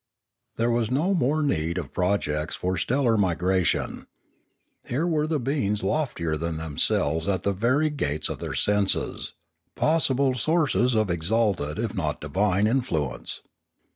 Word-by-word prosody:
There 115 +1 +1
was 115 -2 +1
no 155 +10 +1
more 155 -2 +1
need 85 - 0
of 90 - -5
projects 80 -5 0
for 90 +1 -1
stellar 120 +5 +1
migra 95 -1 +1
tion. - - -1 0.8
Here 140 +7 -1
were 155 -3 +1
beings 120 -6 -1
loftier 85 - -1
than 85 0 -3
themselves 80 +1 0
at 95 -2 0
the 100 - +1
very 130 +10 +1
gates 75 - -1
of - - -5
their - - -4
senses, 105 -1 +1 0.4
possible 140 -4 +2
sources 130 -2 +1
of 110 -4 +1
exalted, 85 -3 0
if 110 -2 -2
not 80 -7 -2
divine, 100 +1 +1
influence. 110 - -1
105 Hz, 140 wpm, -25 LUFS, 85-130 Hz, 0.8 s, possible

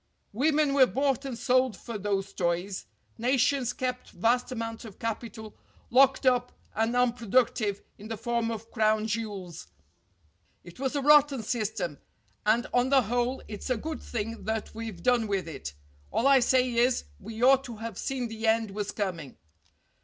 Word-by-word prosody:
Women 295 +4 +2
were 270 -2 +6
bought 275 0 0
and 260 -4 -4
sold 255 -2 +2
for 235 +4 -8
those 195 -1 -2
toys. 175 +2 -2 0.3
Nations 255 +1 +2
kept 250 0 -4
vast 240 +7 +1
amounts 225 -1 -4
of 215 -5 -11
capital 225 -1 -5 0.4
locked 265 +2 +5
up 250 -1 +3 0.2
and 225 +2 0
unproductive 235 -3 +1 0.2
in 210 - -9
the 225 0 -4
form 235 +1 -1
of 225 0 -6
crown 215 -1 +2
jewels. 205 -6 -4 1.0
It 175 +5 -13
was 270 +1 -1
a 285 - 0
rotten 290 -4 +5
system, 210 - -2 0.5
and 230 +3 +3
on 245 +1 +3
the 270 -2 +5
whole 245 +4 -1
it's 210 +4 -7
a 255 - +1
good 315 +7 -5
thing 225 0 -5
that 220 0 -3
we've 220 -6 -7
done 245 -3 +3
with 195 -3 -1
it. 135 - -7 0.3
All 235 - 0
I 275 -1 +7
say 255 +1 +3
is, 240 +1 +2 0.2
we 225 +3 -6
ought 270 +1 +6
to 235 - -7
have 225 -2 -6
seen 260 -3 -2
the 225 0 -4
end 220 -1 +2
was 205 0 -3
coming." 175 -9 -4
230 Hz, 165 wpm, -28 LUFS, 215-255 Hz, 1.0 s, I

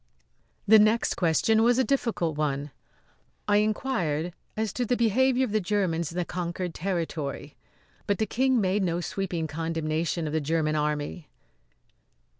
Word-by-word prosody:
The 220 +1 +8
next 215 +2 +3
question 185 +6 +2
was 240 +1 +4
a 260 - +4
difficult 230 - 0
one. 145 -1 -2 0.8
I 205 0 +4
inquired 205 - 0 0.2
as 220 -3 -1
to 250 - -1
the 245 +1 0
behaviour 255 +3 +3
of 230 - -6
the 215 0 +1
Germans 180 -5 -1
in 170 - -8
the 180 - 0
conquered 175 0 -4
territory; 165 -6 -3 0.5
but 200 - +1
the 220 - +1
King 260 +2 +1
made 195 0 +1
no 175 -2 0
sweeping 175 -2 -3
condemnation 160 +1 -2
of 150 - -3
the 160 - +1
German 155 +1 0
Army. 150 +1 -2
180 Hz, 150 wpm, -27 LUFS, 160-220 Hz, 0.8 s, The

